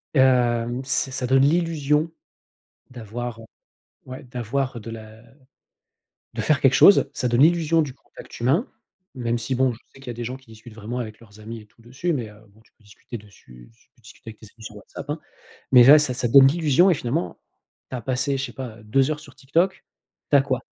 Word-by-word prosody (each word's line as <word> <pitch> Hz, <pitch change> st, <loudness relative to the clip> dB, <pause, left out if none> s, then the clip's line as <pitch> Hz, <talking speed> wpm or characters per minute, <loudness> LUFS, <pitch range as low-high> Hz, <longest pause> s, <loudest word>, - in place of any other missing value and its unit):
hem, 125 Hz, -2 st, +2 dB
ç -, -, -14 dB, 0.2 s
ça 130 Hz, -1 st, -3 dB
donne 135 Hz, +1 st, +4 dB
l'illusion 155 Hz, 0 st, +1 dB, 0.8 s
d'avoir, 120 Hz, 0 st, -7 dB, 0.7 s
ouais, 130 Hz, 0 st, -9 dB
d'avoir 125 Hz, +1 st, -3 dB
de 115 Hz, -, -9 dB
la 110 Hz, 0 st, -12 dB, 1.1 s
de -, -, -5 dB
faire 150 Hz, -2 st, +1 dB
quelque 135 Hz, -, +5 dB
chose, 195 Hz, -8 st, +6 dB
ça 125 Hz, -2 st, -2 dB
donne 120 Hz, +3 st, +3 dB
l'illusion 165 Hz, 0 st, +3 dB
du 140 Hz, -4 st, -5 dB
contact -, -, -14 dB
humain, 140 Hz, -, +1 dB, 0.5 s
même 120 Hz, -2 st, -2 dB
si 120 Hz, +3 st, -3 dB
bon, 130 Hz, 0 st, +2 dB
je -, -, -16 dB
sais -, -, -17 dB
qu'il 135 Hz, -, -15 dB
y -, -, -5 dB
a -, -, -6 dB
des 120 Hz, +1 st, -6 dB
gens 125 Hz, +2 st, -5 dB
qui 130 Hz, -, -25 dB
discutent 110 Hz, 0 st, -14 dB
vraiment 115 Hz, +3 st, -6 dB
avec 110 Hz, -3 st, -7 dB
leurs 110 Hz, -2 st, -17 dB
amis 110 Hz, +1 st, -8 dB
et 105 Hz, -, -16 dB
tout 115 Hz, +2 st, -26 dB
dessus, 130 Hz, +9 st, -3 dB
mais 120 Hz, -6 st, -4 dB
heu, 105 Hz, 0 st, -17 dB
bon, 105 Hz, +2 st, -24 dB
tu -, -, -31 dB
peux 110 Hz, -, -31 dB
discuter 105 Hz, +3 st, -10 dB
dessus 65 Hz, -, -17 dB
su -, -, -30 dB
tu -, -, -63 dB
peux -, -, -27 dB
discuter 110 Hz, +1 st, -13 dB
avec 110 Hz, -, -15 dB
tes 110 Hz, -, -13 dB
amis 110 Hz, -, -14 dB
sur 105 Hz, -, -9 dB
WhatsApp, 120 Hz, +7 st, -10 dB
hein? 150 Hz, -, -4 dB, 0.5 s
Mais 125 Hz, -2 st, +9 dB
là, 145 Hz, +4 st, +9 dB
ça 145 Hz, -4 st, 0 dB
ça 125 Hz, 0 st, -2 dB
donne 135 Hz, +3 st, +8 dB
l'illusion 160 Hz, +4 st, +3 dB
et -, -, +4 dB
finalement, 120 Hz, -, -3 dB, 0.5 s
tu 130 Hz, -, -4 dB
as -, -, -5 dB
passé, 130 Hz, +2 st, -1 dB
je 135 Hz, -, -2 dB
sais 120 Hz, -, -11 dB
pas, 125 Hz, -4 st, -8 dB
2 135 Hz, +6 st, +1 dB
heures 150 Hz, -1 st, -3 dB
sur 140 Hz, -3 st, -15 dB
TikTok, 170 Hz, +8 st, -1 dB, 0.5 s
tu 145 Hz, -, +6 dB
as 140 Hz, -, +5 dB
quoi? 130 Hz, -3 st, -2 dB
125 Hz, 225 wpm, -23 LUFS, 115-140 Hz, 1.1 s, Mais